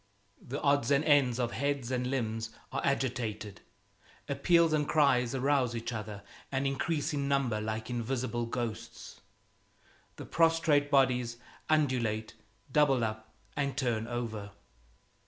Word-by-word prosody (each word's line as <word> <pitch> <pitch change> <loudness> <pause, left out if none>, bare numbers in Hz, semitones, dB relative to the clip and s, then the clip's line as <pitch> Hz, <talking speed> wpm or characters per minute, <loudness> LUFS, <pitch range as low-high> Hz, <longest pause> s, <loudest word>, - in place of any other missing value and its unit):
The 140 +4 -5
odds 140 0 +2
and 140 +1 +3
ends 135 -5 +4
of 120 -2 -1
heads 140 -3 -1
and 125 -1 0
limbs 115 -4 -2 0.2
are 140 - -2
agitated, 115 -6 -2 0.7
appeals 170 -2 +3
and 150 -1 +1
cries 135 -5 +3
arouse 130 -2 +1
each 115 +1 -4
other 105 -2 -6 0.3
and 135 0 0
increase 145 +2 -1
in 140 -1 -1
number 135 -6 +1
like 110 0 -3
invisible 120 0 -2
ghosts. 115 -2 -5 0.9
The - - -8
prostrate 165 -3 +3
bodies 125 -4 +2 0.3
undulate, 125 -8 +1 0.4
double 135 -4 +4
up, 110 0 -4 0.2
and 140 -1 -1
turn 115 -4 0
over. 115 -4 -4
125 Hz, 125 wpm, -31 LUFS, 115-140 Hz, 0.9 s, ends